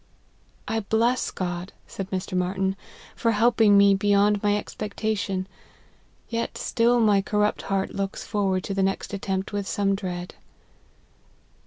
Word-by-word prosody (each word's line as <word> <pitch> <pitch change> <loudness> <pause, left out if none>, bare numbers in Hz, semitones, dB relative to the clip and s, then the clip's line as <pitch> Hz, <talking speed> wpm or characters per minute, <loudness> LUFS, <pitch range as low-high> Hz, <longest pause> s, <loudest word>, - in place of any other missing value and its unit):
" - - -35
I 225 - 0
bless 225 +4 +1
God," 180 0 -4
said 195 -1 -6
Mr. 185 -1 -3
Marty 180 +1 -1
n, 190 0 +1 0.2
" - - -20
for 230 -1 +1
helping 220 -2 +4
me, 200 0 +6
beyond 205 +1 +3
my 205 0 +2
expectation. 205 -2 -3 0.8
Yet 230 0 -3
still 240 +1 +2
my 210 -3 +4
corrupt 210 +1 0
heart 195 -1 -2
looks 195 0 -3
forward 195 -3 0
to 195 - -3
the 195 - 0
next 195 +1 -1
attempt 195 0 -3
with 200 -1 -2
some 200 -1 +1
dread." 180 -3 -4
200 Hz, 150 wpm, -25 LUFS, 190-210 Hz, 0.8 s, me